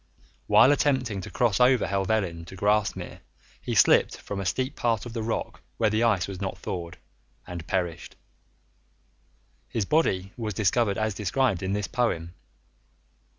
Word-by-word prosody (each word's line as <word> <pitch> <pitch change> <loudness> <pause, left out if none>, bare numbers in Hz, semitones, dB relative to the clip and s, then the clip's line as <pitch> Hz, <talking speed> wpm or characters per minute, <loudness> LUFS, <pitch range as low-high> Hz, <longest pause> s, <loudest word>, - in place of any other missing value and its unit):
While 135 - +6
attempting 130 -8 +1
to - - -8
cross 120 -4 +1
over 125 -1 +4
Helvellyn 95 -4 -1
to 90 - -11
Grasmere 105 +2 0 0.4
he - - -3
slipped - - +4
from 100 - -6
a 95 - -2
steep 130 +7 -1
part 115 -2 0
of 120 - -8
the 115 - -3
rock 110 +1 -3 0.2
where 110 -2 +2
the 110 +1 +1
ice 110 -7 +2
was 95 -1 -7
not 95 - -3
thawed, 85 -2 -6 0.5
and 85 -3 -7
perished. 85 -4 -3 1.5
His 110 -4 -1
body 95 - +1
was 110 -4 -4
discovered 105 0 +1
as 110 -1 0
described 105 0 0
in 95 +1 -2
this 105 -1 -1
poem. 85 -9 -1
105 Hz, 150 wpm, -26 LUFS, 95-115 Hz, 1.5 s, While